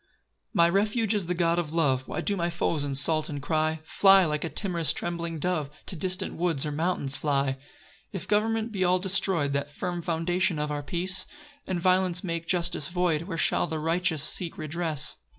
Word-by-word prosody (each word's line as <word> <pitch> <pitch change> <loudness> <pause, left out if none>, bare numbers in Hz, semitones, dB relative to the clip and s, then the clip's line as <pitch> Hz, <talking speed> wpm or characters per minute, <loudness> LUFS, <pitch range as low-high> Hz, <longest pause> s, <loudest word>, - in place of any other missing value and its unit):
1 - - -41 0.5
My 170 0 +6
refuge 210 +4 +1
is 200 -5 0
the 180 - -1
God 170 0 +2
of 160 -3 -3
love; 135 -6 +1
Why - - -3
do 205 - 0
my 175 -2 0
foes 170 -3 -1
insult 145 +3 +1
and 145 -2 -4
cry, 155 +2 0
"Fly 195 +3 +5
like 150 -1 -1
a 165 - -2
timorous 170 -5 0
trembling 170 -1 -3
dove, 155 -3 -1 0.2
"To - - -4
distant 185 +3 -1
woods 165 -4 0
or 150 - -2
mountains 150 -3 0
fly"? 140 -1 +1
2 135 - -6 0.6
If 190 - -5
government 225 +2 +1
be 195 -3 -1
all 180 0 +4
destroy'd 180 -5 +1
(That 140 +1 -1
firm 175 +4 -4
foundation 175 +1 0
of 150 0 -2
our 145 0 -2
peace) 185 +5 0 0.4
And 185 -2 -1
violence 185 0 +2
make 170 -2 -3
justice 170 -4 0
void, 175 -3 0
Where 165 -4 -4
shall - - +2
the 160 - -3
righteous 165 0 0
seek 175 +3 -2
redress? 155 -2 -2
170 Hz, 195 wpm, -27 LUFS, 155-185 Hz, 0.6 s, My